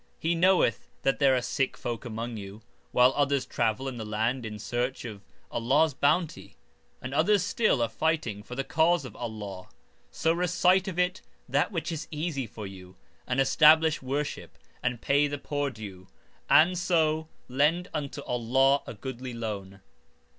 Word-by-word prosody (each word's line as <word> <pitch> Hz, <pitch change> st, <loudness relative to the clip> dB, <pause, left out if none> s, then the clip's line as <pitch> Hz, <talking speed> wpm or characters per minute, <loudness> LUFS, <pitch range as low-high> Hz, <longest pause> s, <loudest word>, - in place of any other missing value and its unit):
He 165 Hz, +2 st, 0 dB
knoweth 175 Hz, -, +3 dB, 0.2 s
that 135 Hz, -, +1 dB
there 135 Hz, -2 st, +5 dB
are 125 Hz, -, 0 dB
sick 135 Hz, +1 st, -1 dB
folk 120 Hz, +2 st, -5 dB
among 115 Hz, +1 st, -4 dB
you, 100 Hz, +1 st, -9 dB, 0.3 s
while 125 Hz, +1 st, +5 dB
others 140 Hz, -2 st, +1 dB
travel 115 Hz, +3 st, -1 dB
in 130 Hz, -2 st, -5 dB
the 110 Hz, -, -4 dB
land 110 Hz, +3 st, -1 dB
in 105 Hz, -1 st, -6 dB
search 125 Hz, +4 st, -3 dB
of 105 Hz, -4 st, -7 dB, 0.3 s
Allah's 140 Hz, +7 st, +2 dB
bounty, 150 Hz, +5 st, 0 dB, 0.5 s
and 130 Hz, +1 st, -5 dB
others 180 Hz, +6 st, +3 dB
(still) 205 Hz, -, +2 dB
are -, -, +1 dB
fighting 120 Hz, -4 st, -1 dB
for 125 Hz, +4 st, -9 dB
the 135 Hz, -, -1 dB
cause 160 Hz, +1 st, +2 dB
of 130 Hz, -, -9 dB
Allah. 105 Hz, -5 st, -6 dB, 0.4 s
So 165 Hz, 0 st, +1 dB
recite 180 Hz, +2 st, +2 dB
of 185 Hz, -3 st, -4 dB
it 180 Hz, +2 st, 0 dB, 0.3 s
that 140 Hz, -, +1 dB
which 170 Hz, -3 st, -3 dB
is 160 Hz, -1 st, -5 dB
easy 150 Hz, -5 st, -3 dB
(for 105 Hz, 0 st, -8 dB
you), 95 Hz, -1 st, -11 dB, 0.3 s
and 125 Hz, +1 st, 0 dB
establish 155 Hz, +3 st, +5 dB
worship 140 Hz, +3 st, -4 dB, 0.2 s
and 125 Hz, -1 st, -2 dB
pay 145 Hz, +1 st, +3 dB
the 145 Hz, 0 st, -4 dB
poor 145 Hz, 0 st, -2 dB
due, 100 Hz, -7 st, -10 dB, 0.4 s
and 170 Hz, +4 st, +5 dB
(so) 160 Hz, -3 st, +1 dB, 0.2 s
lend 150 Hz, +7 st, +1 dB
unto 145 Hz, -2 st, -4 dB
Allah 135 Hz, +4 st, +2 dB
a -, -, -6 dB
goodly 125 Hz, +2 st, -6 dB
loan. 100 Hz, -4 st, -5 dB
135 Hz, 165 wpm, -28 LUFS, 115-160 Hz, 0.5 s, there